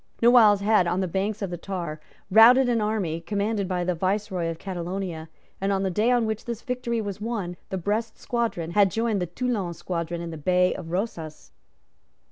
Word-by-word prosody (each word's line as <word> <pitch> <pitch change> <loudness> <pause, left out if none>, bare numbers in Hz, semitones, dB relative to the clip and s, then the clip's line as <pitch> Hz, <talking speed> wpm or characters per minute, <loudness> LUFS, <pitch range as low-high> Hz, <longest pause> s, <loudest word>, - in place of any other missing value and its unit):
Noailles 230 -4 +6
had, 205 -3 +3
on 175 +2 0
the 190 - 0
banks 200 +4 -2
of 190 - -3
the 175 - -4
Tar, 170 -5 -5 0.3
routed 240 +5 +7
an 235 -2 +1
army 200 -7 -1
commanded 205 +2 -1
by 180 -1 -1
the 180 +1 0
Viceroy 185 0 -1
of 165 - -4
Catalonia; 175 -2 -5 0.3
and, 195 +1 +1
on 195 0 0
the 190 - 0
day 215 +6 +2
on 245 -2 +3
which 220 -1 -3
this 235 -1 -5
victory 250 -3 -2
was 205 -2 -5
won, 210 -6 -3
the 190 - -2
Brest 215 +5 -2
squadron 225 -9 -2
had 200 +1 +4
joined 225 0 0
the 180 - -1
Toulon 200 -3 -2
squadron 170 0 -4
in 170 0 -5
the 160 - -6
Bay 180 +3 +2
of 165 - -8
Rosas. 170 -4 -4
195 Hz, 195 wpm, -25 LUFS, 175-220 Hz, 0.3 s, routed